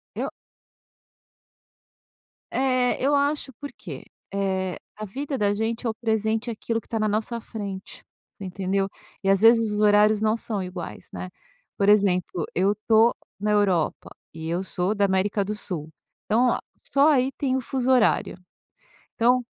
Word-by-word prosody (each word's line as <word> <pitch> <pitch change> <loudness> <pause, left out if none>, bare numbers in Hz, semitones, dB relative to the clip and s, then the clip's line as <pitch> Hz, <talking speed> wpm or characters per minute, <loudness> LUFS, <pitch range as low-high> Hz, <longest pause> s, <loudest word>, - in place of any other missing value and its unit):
Eu - - -3 2.2
É, 255 -1 +1
eu 280 +3 +3
acho, 285 -1 0
porque, 285 +5 -9 0.3
eh, 190 -2 -1 0.2
a 215 - -5
vida 275 +7 -4
da 205 -2 +2
gente 225 +3 -2
é - - +2
o - - -1
presente, 220 0 -1
é - - -1
aquilo 230 +1 -2
que - - -23
tá 225 - -2
na 215 - +2
nossa 220 +3 -1
frente. 200 -4 -7 0.3
Você - - -11
entendeu? 195 +1 -1 0.3
E, 195 - +1
às 195 0 +4
vezes, 225 0 +5
os 210 - -1
horários 210 0 +5
não 220 0 +2
são 220 -3 -3
iguais, 180 -1 -7
né? 185 - -5 0.5
Por 200 - +2
exemplo: 185 -5 +3
eu 195 +3 +2
estou 220 +2 +3 0.2
na 210 +1 0
Europa 195 -6 +1 0.2
e 160 0 -6
eu 175 +3 -1
sou 185 +1 -1
da 200 -1 +2
América 195 +1 +1
do 210 - -3
Sul, 165 -7 -4 0.4
então, 240 +3 +3
ah, - - 0 0.3
só 280 +1 +5
aí 265 -2 +3
tem 265 -2 0
o 265 - 0
fuso 255 +1 -2
horário. 245 -7 +3 0.8
Então 250 +2 +4
215 Hz, 165 wpm, -25 LUFS, 195-235 Hz, 2.2 s, vezes